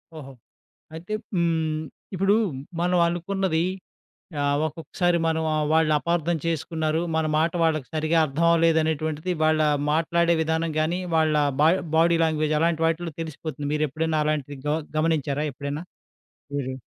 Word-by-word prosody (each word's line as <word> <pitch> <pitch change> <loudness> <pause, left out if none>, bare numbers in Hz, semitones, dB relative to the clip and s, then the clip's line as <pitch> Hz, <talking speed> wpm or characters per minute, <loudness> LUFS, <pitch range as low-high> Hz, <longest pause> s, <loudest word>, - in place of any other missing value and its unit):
ఓహో! 135 -3 -9 0.6
అయితే, 170 +6 -8 0.2
హ్మ్, 160 -3 0 0.3
ఇప్పుడూ 195 +2 +3 0.5
మనవనుకున్నదీ 175 0 +1 0.8
ఆహ్, 145 0 +1
ఒకొక్కసారి 170 +3 -1
మనం 160 0 0
ఆహ్, 155 0 +1
వాళ్ళపార్థం 160 +2 +2
చేసుకున్నారు, 160 -1 -1 0.2
మన 160 -1 +1
మాట 160 +1 +2
వాళ్ళకి 155 -5 +1
సరిగా 155 +1 +1
అర్థవవ్వలేదనేటువంటిది 160 +1 +1
వాళ్ళా 155 0 +3 0.3
మాట్లాడే 170 +2 +2
విధానం 160 0 -1
గానీ, 170 +4 0 0.2
వాళ్ళా 155 -2 +3 0.2
బా 155 - +6 0.3
బాడీ 170 +1 +4
లాంగ్వేజ్, 155 -1 0
అలాంటి 165 -1 +1
వాటిల్లో 165 0 -2
తెలిసిపోతుంది. 155 -2 -5
మీరెప్పుడన్న 155 +1 0
అలాంటిది 145 -2 -2
గొ 150 +1 +1 0.2
గమనించారా 150 -2 0
ఎప్పుడైనా 140 +3 -5 0.7
మీరు? 130 -2 -2
160 Hz, 115 wpm, -24 LUFS, 155-170 Hz, 0.8 s, బా